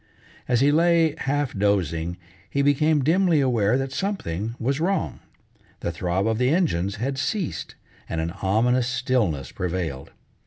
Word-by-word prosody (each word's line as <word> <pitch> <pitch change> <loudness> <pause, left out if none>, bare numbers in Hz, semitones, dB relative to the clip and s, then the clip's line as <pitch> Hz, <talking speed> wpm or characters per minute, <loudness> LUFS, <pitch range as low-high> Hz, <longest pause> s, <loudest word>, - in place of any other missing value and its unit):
As 120 -1 +2
he 145 +1 +5
lay, 165 0 +4
half 145 -2 -1
dozing, 90 -4 0 0.3
he 140 - 0
became 145 +1 +3
dimly 170 +1 +3
aware 125 -4 +2
that 135 0 -3
something 115 - -3
was 135 +4 0
wrong. 190 +4 -1 0.6
The 85 - -2
throb 90 +3 -1
of 110 0 0
the 125 0 +3
engines 105 - +1
had 135 +5 -3
ceased, 195 +3 -3 0.3
and 80 - -2
an 80 +1 -2
ominous 120 +6 +2
stillness 125 - 0
prevailed. 85 -6 -4
125 Hz, 145 wpm, -24 LUFS, 95-145 Hz, 0.6 s, he